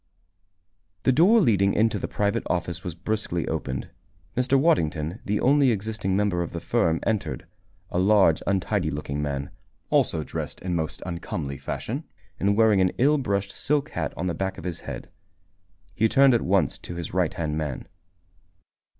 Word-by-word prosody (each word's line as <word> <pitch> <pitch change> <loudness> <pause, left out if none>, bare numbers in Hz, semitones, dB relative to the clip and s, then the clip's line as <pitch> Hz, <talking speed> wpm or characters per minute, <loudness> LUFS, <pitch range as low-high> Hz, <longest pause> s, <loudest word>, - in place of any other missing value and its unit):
The - - +4
door 185 - +6
leading 100 - +3
into 110 +1 +2
the - - -3
private 100 -1 0
office 85 -1 -2
was 90 -3 -5
brusquely 90 -2 -2
opened. 65 -1 -3 0.4
Mr. 125 +2 +3
Waddington, 85 - +1
the 105 +1 0
only 140 +1 +4
existing 105 -3 -1
member 100 -4 +1
of 85 - -4
the 85 - -3
firm, 85 -6 +1
entered 110 -5 -1 0.5
a 90 - 0
large, 95 -4 +4
untidy 95 -3 0
looking 75 -1 -3
man, 70 -1 -3 0.4
also 80 - +2
dressed - - -5
in 90 -1 -3
most 80 -3 -2
uncomely 80 -5 -4
fashion, 70 - -4 0.4
and 100 +1 +2
wearing 110 -4 +5
an 90 - +4
ill 145 +4 +4
brushed 100 -5 -1
silk 150 +5 0
hat - - -2
on 85 - -2
the 90 - 0
back 95 +3 -3
of - - -9
his 90 -3 -4
head. - - -8 0.8
He 110 +5 +2
turned 135 +1 +6
at 115 - +3
once - - +1
to 85 - -8
his 85 -1 -5
righthand 80 -4 0
man. 75 -4 -4
95 Hz, 165 wpm, -25 LUFS, 85-110 Hz, 0.8 s, door